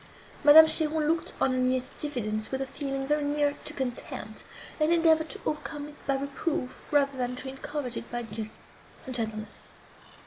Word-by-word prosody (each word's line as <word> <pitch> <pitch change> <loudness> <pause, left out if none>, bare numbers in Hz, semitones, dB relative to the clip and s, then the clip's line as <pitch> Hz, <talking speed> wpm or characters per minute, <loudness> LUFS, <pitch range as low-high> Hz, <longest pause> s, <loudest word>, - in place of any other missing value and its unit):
Madame 305 +2 +10
Cheron 315 -1 +2
looked 325 +1 0
on 265 - +3
her 255 - 0
niece's 255 0 0
diffidence 215 -7 -1
with 265 - -2
a 270 - -1
feeling 270 0 -3
very 295 +1 +1
near 290 0 +1
to - - -3
contempt, 255 -3 -5 0.4
and 305 +1 +3
endeavoured 325 -2 +4
to - - -7
overcome 295 -1 -3
it 300 - -17
by 275 - +2
reproof, 280 0 -3
rather 280 -2 +3
than 250 -1 -2
to 255 - -7
encourage 270 -1 -4
it - - -7
by 240 0 -2 0.8
gentleness. 220 -4 -4
280 Hz, 165 wpm, -28 LUFS, 255-300 Hz, 0.8 s, Madame